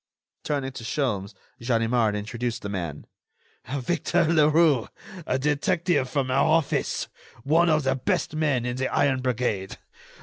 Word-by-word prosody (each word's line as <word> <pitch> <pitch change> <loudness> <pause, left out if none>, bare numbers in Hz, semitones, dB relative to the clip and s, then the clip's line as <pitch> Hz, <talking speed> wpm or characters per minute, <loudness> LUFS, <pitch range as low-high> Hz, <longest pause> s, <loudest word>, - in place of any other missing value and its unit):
Turning 140 -3 -2
to 125 - -9
Sholmes, 110 -6 -2 0.3
Ganimard 115 -2 +1
introduced 115 +3 -4
the 100 - -4
man: 85 -7 -5 0.7
"Victor 170 +5 0
Leroux, 155 -4 +4 0.4
a 130 - +1
detective 145 +1 +1
from 130 -1 -1
our 135 +2 +3
office, 155 -2 +1 0.4
one 165 +5 +3
of 155 -1 +2
the 135 0 +1
best 150 +5 -1
men 145 -6 +1
in 125 0 -3
the 130 0 0
iron 135 -2 +1
brigade 120 -6 -2
130 Hz, 135 wpm, -25 LUFS, 120-150 Hz, 0.7 s, Leroux